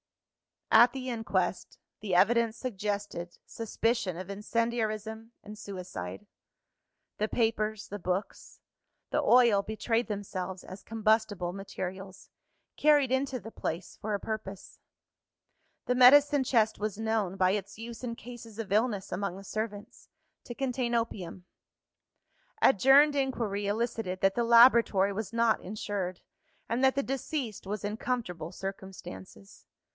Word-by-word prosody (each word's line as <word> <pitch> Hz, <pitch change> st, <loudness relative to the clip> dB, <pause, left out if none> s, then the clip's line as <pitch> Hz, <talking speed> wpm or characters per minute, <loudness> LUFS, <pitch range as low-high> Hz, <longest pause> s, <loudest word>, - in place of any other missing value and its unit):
At 240 Hz, +2 st, +7 dB
the 260 Hz, -1 st, -5 dB
inquest, 195 Hz, -6 st, -2 dB, 0.2 s
the 195 Hz, -4 st, -2 dB
evidence 230 Hz, +4 st, +3 dB
suggested 205 Hz, -6 st, -4 dB
suspicion 225 Hz, -3 st, -1 dB
of 185 Hz, +1 st, -7 dB
incendiarism 220 Hz, +1 st, -2 dB
and 210 Hz, +1 st, -10 dB
suicide. 180 Hz, -, -7 dB, 0.9 s
The 215 Hz, -, +1 dB
papers, 220 Hz, -2 st, -1 dB
the 205 Hz, -, -6 dB
books, 185 Hz, +2 st, -4 dB, 0.5 s
the -, -, +2 dB
oil 235 Hz, -5 st, +5 dB
betrayed 220 Hz, +3 st, -1 dB
themselves 190 Hz, -3 st, -5 dB
as 185 Hz, +2 st, -10 dB
combustible 215 Hz, -5 st, 0 dB
materials, 190 Hz, 0 st, -7 dB, 0.5 s
carried 290 Hz, -4 st, +4 dB
into 265 Hz, 0 st, 0 dB
the 225 Hz, -, -10 dB
place 170 Hz, -3 st, -5 dB
for 210 Hz, 0 st, -1 dB
a -, -, -3 dB
purpose. 205 Hz, -3 st, -6 dB, 1.1 s
The 250 Hz, -, +1 dB
medicine 280 Hz, +2 st, +6 dB
chest 225 Hz, -4 st, +2 dB
was 210 Hz, -1 st, -3 dB
known 220 Hz, -4 st, -1 dB
(by 185 Hz, -1 st, +3 dB
its 200 Hz, 0 st, -3 dB
use 230 Hz, 0 st, -8 dB
in 235 Hz, -2 st, -3 dB
cases 230 Hz, -3 st, -11 dB
of 225 Hz, -4 st, -6 dB
illness 210 Hz, -2 st, +1 dB
among 185 Hz, 0 st, -2 dB
the 195 Hz, -, -10 dB
servants) 210 Hz, 0 st, -6 dB, 0.4 s
to 240 Hz, -, -7 dB
contain 250 Hz, -2 st, -1 dB
opium. 190 Hz, -6 st, -3 dB, 1.1 s
Adjourned 270 Hz, +6 st, +6 dB
inquiry 230 Hz, -7 st, -1 dB
elicited 215 Hz, -3 st, -2 dB
that 195 Hz, 0 st, +3 dB
the 235 Hz, -, +1 dB
laboratory 230 Hz, -4 st, +6 dB
was 215 Hz, +1 st, -4 dB
not 230 Hz, -1 st, +3 dB
insured, 190 Hz, -2 st, -4 dB, 0.5 s
and 235 Hz, +2 st, 0 dB
that 265 Hz, 0 st, +4 dB
the 275 Hz, -, +1 dB
deceased 265 Hz, -, -4 dB
was 210 Hz, 0 st, -4 dB
in 205 Hz, +1 st, -3 dB
comfortable 180 Hz, -11 st, -3 dB
circumstances. 190 Hz, -, -9 dB
215 Hz, 130 wpm, -29 LUFS, 195-235 Hz, 1.1 s, At